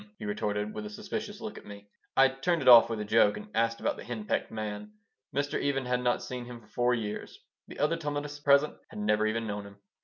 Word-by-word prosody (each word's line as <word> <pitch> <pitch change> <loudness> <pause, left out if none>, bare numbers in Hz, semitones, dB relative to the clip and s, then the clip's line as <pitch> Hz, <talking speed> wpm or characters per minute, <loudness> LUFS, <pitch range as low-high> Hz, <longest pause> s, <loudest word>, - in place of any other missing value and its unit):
he - - -7
retorted, 105 0 -2
with 105 - -5
a 105 - -6
suspicious 105 - -6
look - - -6
at - - -18
me 100 0 -11 0.3
I 135 0 +7
turned 140 +4 0
it - - -3
off 120 -2 +10
with 115 -2 -2
a 105 - -3
joke 105 -1 +4
and 105 0 -9
asked 115 +1 +1
about - - -1
the - - -8
hen 115 -3 -5
pecked - - -1
man. 110 - -5 0.4
Mr. 140 +2 -1
Even 135 -2 0
had 125 0 0
not 120 -1 +1
seen 125 -1 -5
him 120 -1 -9
for 110 - -20
four 120 +2 +2
years. 105 -3 -5 0.3
The - - -10
other 150 +3 +1
Talmudists 145 -2 -4
present 140 +1 +5
had - - -11
never 105 +1 +2
even 115 +1 -1
known 105 -1 -4
him. 100 0 -15
115 Hz, 240 wpm, -29 LUFS, 105-135 Hz, 0.4 s, off